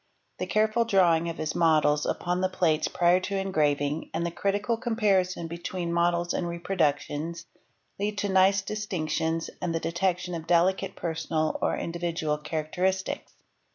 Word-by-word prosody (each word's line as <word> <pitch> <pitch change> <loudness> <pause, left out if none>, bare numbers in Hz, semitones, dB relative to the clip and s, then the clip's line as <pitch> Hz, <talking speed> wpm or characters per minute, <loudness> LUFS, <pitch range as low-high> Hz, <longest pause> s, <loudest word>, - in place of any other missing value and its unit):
The - - -2
careful 215 +2 +2
drawing 175 -6 +3
of 165 - -5
his 155 -1 -2
models 155 -3 +3
upon 180 +1 -1
the 185 - +2
plates 160 -4 +1
prior 175 +1 +3
to 195 +1 -3
engraving 150 -5 0
| - - -41
and 170 - 0
the 170 - -2
critical 205 +5 0
comparison 205 -7 +1
between 170 +1 -4
models 175 0 +1
and 175 - -1
reproductions 170 -2 -1 0.5
lead 205 +1 -2
to 205 0 -1
nice 190 +1 +4
distinctions 165 -6 -2
and 175 -2 -1
the - - +1
detection 180 +1 -1
of 165 -1 -5
delicate 185 +3 +2
personal 160 -1 -2
or - - +1
individual 165 -3 -2
characteristics. 165 +5 -2
175 Hz, 150 wpm, -27 LUFS, 160-190 Hz, 0.5 s, nice